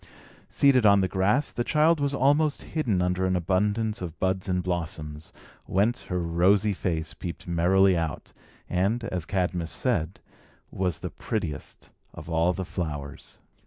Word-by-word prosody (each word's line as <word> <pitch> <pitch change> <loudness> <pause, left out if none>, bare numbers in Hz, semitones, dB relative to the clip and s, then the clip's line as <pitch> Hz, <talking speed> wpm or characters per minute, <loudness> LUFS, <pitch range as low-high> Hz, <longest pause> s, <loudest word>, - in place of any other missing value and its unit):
Seated 135 -4 +4
on 100 -2 +6
the 95 - +1
grass, 100 +10 +1
the 120 - -2
child 155 +4 +3
was 140 -1 0
almost 145 +3 +2
hidden 115 - 0
under 90 +1 0
an 95 0 +1
abundance 105 +5 0
of 85 -2 -6
buds 95 0 -1
and 90 -1 0
blossoms, 80 -4 -4 0.3
whence 105 +6 0
her 90 - -2
rosy 90 +5 +2
face 80 -4 -3
peeped 85 - -7
merrily 90 +3 +4
out, 80 -4 -3 0.3
and, 100 +7 0
as 90 -7 -3
Cadmus 90 -4 -1
said, 80 +4 -1 0.5
was 90 -4 -1
the - - -6
prettiest 85 -11 -5 0.2
of 85 - -9
all 80 +2 +3
the 95 +1 -4
flowers. 75 -6 -6
95 Hz, 150 wpm, -26 LUFS, 85-105 Hz, 0.5 s, on